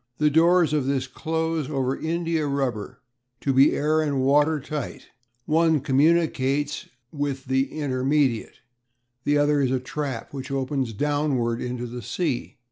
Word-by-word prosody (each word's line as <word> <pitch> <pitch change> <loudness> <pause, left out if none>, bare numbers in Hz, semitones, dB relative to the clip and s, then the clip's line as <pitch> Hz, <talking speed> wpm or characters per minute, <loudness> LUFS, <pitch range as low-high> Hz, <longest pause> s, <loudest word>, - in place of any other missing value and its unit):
The 150 0 +3
doors 165 0 +4
of 145 -4 +1
this 135 -1 0
close 160 +1 -2
over 135 -2 0
india 165 -1 -1
rubber 130 -3 -3 0.4
to 135 - +1
be 135 +2 +5
air 155 +2 +2
and 140 -4 0
water 150 +3 +3
tight; 145 -1 -6 0.4
one 160 0 +3
communicates 145 0 +1 0.2
with 140 -3 -3
the 135 +1 0
"intermediate," 135 -3 0 0.6
the 145 0 +3
other 145 0 +3
is 130 - +2
a 130 0 +1
trap 130 -2 -5
which 130 -2 -6
opens 135 -3 -2
downwards 135 -2 0
into 125 0 -4
the 120 +1 -6
sea. 140 - -3
140 Hz, 140 wpm, -24 LUFS, 130-155 Hz, 0.6 s, be